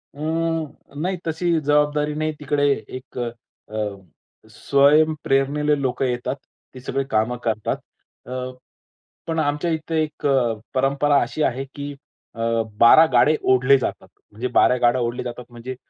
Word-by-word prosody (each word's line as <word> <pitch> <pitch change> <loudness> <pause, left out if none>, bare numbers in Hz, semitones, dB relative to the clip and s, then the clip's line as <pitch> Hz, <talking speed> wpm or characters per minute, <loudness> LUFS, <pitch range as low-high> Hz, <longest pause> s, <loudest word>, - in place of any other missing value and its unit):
अं, 160 -1 -3
नाही 185 +2 -1
तशी 165 +1 +1
जबाबदारी 150 0 +1
नाही. 155 +1 -1
तिकडे 145 -1 +1 0.3
एक 130 - -14
अ, 115 -2 -8 0.7
स्वयंप्रेरणेने 150 0 +2
लोकं 130 0 -1
येतात. 125 +1 -2 0.4
ते 130 - -10
सगळे 135 +2 -2
कामं 110 +3 +1
करतात. 110 -2 -1 0.5
अ, 125 - -5 0.9
पण 165 -1 -1
आमच्या 150 +2 0
इथे 160 0 -2
एक 150 -1 -7 0.5
परंपरा 140 +2 +2
अशी 155 - -3
आहे 130 +2 -1
की 145 0 -6 0.4
अ, 115 0 0 0.2
12 155 +7 +8
गाडे 145 +6 +5
ओढले 130 +2 +5
जातात. 130 - -4 0.2
म्हणजे 115 +5 -4
12 125 - +5
गाड्या 120 +1 +3
ओढले 120 +1 -2
जातात, 120 0 -7
म्हणजे 120 +2 -7
140 Hz, 130 wpm, -22 LUFS, 125-155 Hz, 0.9 s, 12